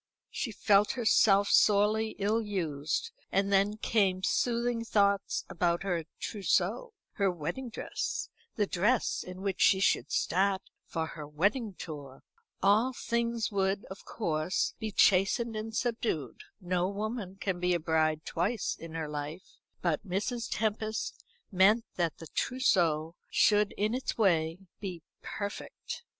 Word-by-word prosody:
She 235 - -3
felt 205 -1 +3
herself 205 -4 +4
sorely 215 +1 +4
ill 210 +3 +1
used; 175 - -2 0.2
and 200 +1 +1
then 200 +2 +3
came 195 -4 +1
soothing 235 +1 +1
thoughts 200 -3 +1
about 170 +1 0
her 175 -4 -1
trousseau, 440 - 0 0.2
her 200 -1 +1
wedding 175 - -4
dress, 220 - -3 0.3
the 210 - +2
dress 210 +6 +1
in 185 +1 -8
which 195 -2 -2
she 190 - +5
should 195 - +2
start 190 +1 +1 0.2
for 160 -1 -2
her 155 -2 -8
wedding 200 - 0
tour. 145 -6 -8 0.4
All 215 +6 +4
things 235 -2 -1
would 195 0 0
of 190 - -9
course 170 -4 -1
be 220 -2 -3
chastened 205 +5 +3
and 220 +1 -5
subdued. 225 - -2
No 180 -1 0
woman 205 -1 -4
can 190 -3 -2
be 180 0 +2
a - - 0
bride 155 -1 +1
twice 195 +6 -1
in 165 -1 -9
her 160 -2 -3
life; 150 +4 -7 0.3
but 170 -4 0
Mrs. 215 +5 -2
Tempest 220 0 -2 0.3
meant 210 +5 +4
that 170 -3 0
the 165 - -9
trousseau 165 - +1 0.2
should, 210 -1 +4
in 210 +2 0
its 255 +1 -2
way, 165 -6 +2 0.2
be 180 -5 -6 0.2
perfect. 205 -1 -6
195 Hz, 135 wpm, -30 LUFS, 175-220 Hz, 0.4 s, she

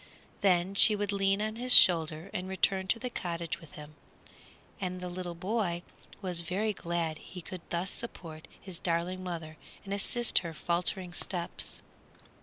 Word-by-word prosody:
Then 185 -1 +3
she 210 +2 +7
would 205 -1 -1
lean 195 +1 +1
on 215 +1 -3
his 250 +1 +1
shoulder 165 -3 +7
and 180 +1 -3
return 190 0 +1
to 225 - +2
the 250 +1 -5
cottage 170 -5 -3
with 160 -3 -14
him, 150 0 -10 0.9
and 185 -1 -3
the 180 -1 -5
boy 180 -2 -1 0.4
was 180 -2 0
very 200 +6 -1
glad 170 -3 -2
he 185 - -10
could 185 +1 -7
thus 175 +3 -1
support 165 -9 -5
his 185 -4 -8
darling 175 +2 -1
mother 165 -3 -6 0.3
and 195 - -4
assist 235 +4 +2
her 165 -3 -7
faltering 175 +2 -1
steps. 175 -1 -4
180 Hz, 155 wpm, -30 LUFS, 170-195 Hz, 0.9 s, she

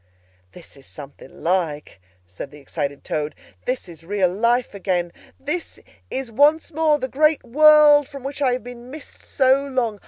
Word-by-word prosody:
"This 175 - -13
is 135 - -15
something 140 -2 -13
like!" 165 - -2 0.2
said 90 +9 -9
the 145 - -14
excited 140 0 -5
Toad. 150 0 -3 0.3
"This 250 -5 -3
is 165 -2 -13
real 185 0 0
life 235 +4 +1
again, 180 -3 -2 0.3
this 305 +5 -4 0.3
is 260 -3 -4
once 300 +7 +3
more 310 -1 +2
the 260 - -4
great 305 +3 +2
world 295 +2 +6
from 275 -3 -10
which 275 +1 -6
I 260 -3 +2
have 250 - -4
been 245 0 -10
missed 295 +2 -11
so 265 0 +2
long! 240 -6 -2
245 Hz, 165 wpm, -21 LUFS, 175-285 Hz, 0.3 s, world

